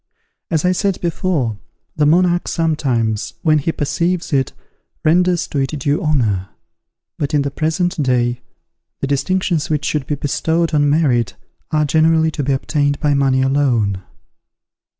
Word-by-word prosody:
As 160 -1 0
I 180 - +4
said 190 +1 0
before, 160 - -1 0.4
the 150 -2 +2
monarch 175 +2 +3
sometimes, 130 - -1
when 155 -2 +4
he 155 +3 -1
perceives 170 +3 -1
it, 135 -2 +1 0.5
renders 175 +2 +3
to 145 - -2
it 135 +3 -1
due 145 +5 0
honour; 115 - 0 0.7
but 150 +1 -1
in 145 - +2
the 140 - -3
present 160 +3 -1
day, 125 -2 +1 0.6
the - - 0
distinctions 160 +4 0
which 150 -2 -1
should 150 -3 -1
be 150 - -1
bestowed 160 +4 -1
on 145 -1 +3
merit 135 -7 +1 0.3
are 150 -1 +1
generally 160 +1 +3
to 150 - -3
be 140 0 -1
obtained 145 +1 0
by 150 -2 +1
money 135 -2 +2
alone. 125 -8 +1
150 Hz, 150 wpm, -18 LUFS, 135-165 Hz, 0.7 s, I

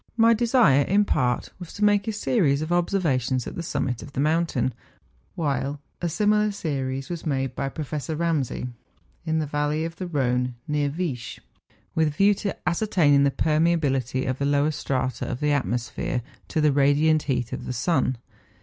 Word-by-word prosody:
My 230 0 +6
desire, 230 - +4
in 200 +8 +3
part, 125 -9 0
was 175 -3 -9
to 210 - -3
make 205 0 +3
a - - +1
series 175 - +1
of 155 - -5
ob¬ 175 0 +2
servations 130 - 0
at - - -6
the - - -3
summit 125 -7 -2
of 140 - -10
the - - -4
mountain, 150 -4 +1 0.6
while 145 -2 -1 0.2
a 175 - 0
similar 210 +3 +2
series 135 -8 -3
was 170 -2 -5
made 135 -4 -1
by 135 - -2
Professor 155 +1 -4
Ramsay, 155 -6 -1 0.6
in 160 0 +1
the 155 - 0
valley 150 +2 -1
of 165 +1 -6
the 185 - -4
Rhone, 125 -5 0
near 150 -1 0
Viesch, 145 -6 -4 0.6
with 160 -1 +2
a - - +1
view 195 +8 +4
to 200 -1 -4
ascertaining 170 -7 +3
the - - +4
permeability 145 -5 +1
of 130 0 -2
the 140 - 0
lower 145 +2 +2
strata 130 -3 -2
of 125 - -3
the 150 0 +1
atmosphere 125 -2 -1 0.2
to - - -2
the 150 -1 +4
radiant 145 +3 +3
heat 125 -3 -1
of - - -5
the - - -2
sun. 130 -1 +1
150 Hz, 180 wpm, -25 LUFS, 135-170 Hz, 0.6 s, My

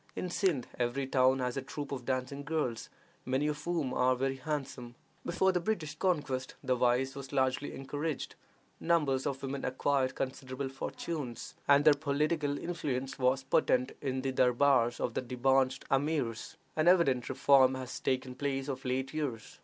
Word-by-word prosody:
In 180 - -3
Sindh 175 -11 +1
every 125 +3 0
town 130 0 +3
has 125 -1 -2
a - - -1
troop 145 +2 -6
of 130 -3 -4
dancing 130 +2 -2
girls, 145 -7 -2 0.3
many 130 +3 0
of 150 -1 -2
whom 165 -7 -1
are 130 0 +3
very 135 +1 -1
handsome. 130 -4 -4 0.3
Before 190 +2 +2
the 180 - +1
British 170 -6 -2
conquest 145 -8 -1
the 130 - +2
vice 125 +2 +2
was 135 -1 -8
largely 130 0 0
encouraged; 145 +2 -4 0.5
numbers 150 -6 +1
of 135 -2 -2
the 140 - -5
women 135 0 -4
acquired 130 0 0
considerable 130 0 -4
fortunes, 135 -1 -5
and 140 +1 +5
their 155 - +9
political 145 0 0
influence 140 -7 -3
was 130 +1 +2
potent 130 -1 +2
in 130 -2 -2
the 135 - 0
durbars 125 -1 +3
of 120 - -1
the - - -1
debauched 130 +1 +1
Amirs. 135 -5 -1 0.2
An 155 +1 +1
evident 140 -9 +4
reform 130 0 +5
has 130 -1 -6
taken 130 -1 -1
place 135 0 -2
of 135 - -4
late 130 +1 -2
years. 135 -8 -4
135 Hz, 165 wpm, -31 LUFS, 130-145 Hz, 0.5 s, their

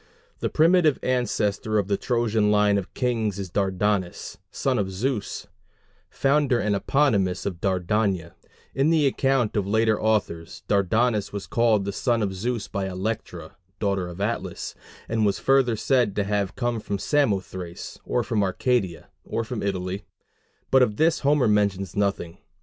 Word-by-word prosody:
The - - -1
primitive 160 -2 +4
ancestor 110 -4 0
of 100 -2 +1
the 100 - +1
Trojan 110 -2 +1
line 105 -1 +3
of 95 - -8
kings 115 -6 0
is 95 -3 -5
Dardanus, 95 -1 -1
son 130 -3 -1
of 95 -2 -1
Zeus, 105 +3 -3 0.6
founder 140 -2 +2
and 105 -2 +1
eponymus 100 -6 +1
of 90 -4 -4
Dardania: 95 -1 0 0.4
in 135 +3 +2
the 160 -3 +3
account 135 -4 +1
of 100 -2 0
later 110 +1 +2
authors, 105 -7 -1
Dardanus 105 +2 +1
was 100 -1 -5
called 115 -4 +2
the 100 - -2
son 115 +2 0
of 95 -2 -1
Zeus 115 +4 -3
by 100 -2 -3
Electra, 90 -4 -5 0.2
daughter 100 -3 0
of 90 +1 -9
Atlas, 105 +4 -3 0.3
and 110 -1 0
was 100 -2 +2
further 135 -3 +3
said 120 -2 +1
to 105 - +1
have 100 -1 -1
come 120 -2 -1
from 100 -1 -3
Samothrace, 95 - -2
or 125 - 0
from 110 -3 0
Arcadia, 95 -2 0
or 115 - -2
from 115 -1 -5
Italy; 95 0 -3 0.7
but 130 - +6
of 110 -5 +2
this 160 +1 +3
Homer 140 -3 +3
mentions 100 -3 +1
nothing. 100 -4 -1
105 Hz, 155 wpm, -25 LUFS, 95-120 Hz, 0.7 s, but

